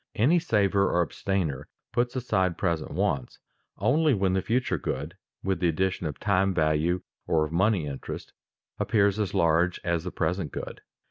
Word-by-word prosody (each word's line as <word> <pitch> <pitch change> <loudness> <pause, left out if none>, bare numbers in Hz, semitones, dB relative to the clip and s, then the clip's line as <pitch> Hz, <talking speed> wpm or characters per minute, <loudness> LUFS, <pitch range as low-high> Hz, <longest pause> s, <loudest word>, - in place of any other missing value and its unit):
Any 150 +11 +4
saver 100 - +2
or 85 - +3
abstainer 80 -3 -2 0.2
puts 120 +1 0
aside 95 -8 0
present 85 -5 -1
wants 65 -3 -1 0.4
only 150 +1 +3
when 95 -2 +1
the 95 - +1
future 115 - 0
good, 75 +6 -4 0.3
with 95 0 0
the 90 - +2
addition 90 +1 0
of 75 - -6
time 95 -1 +2
value 80 +2 +1 0.2
or 80 -1 +2
of 75 - -7
money 95 0 +2
interest, 70 -2 -6 0.5
appears 100 -2 +2
as 100 -2 -1
large 85 0 +2
as 85 -2 0
the 90 - -3
present 90 -4 -1
good. - - -6
95 Hz, 160 wpm, -27 LUFS, 80-100 Hz, 0.5 s, Any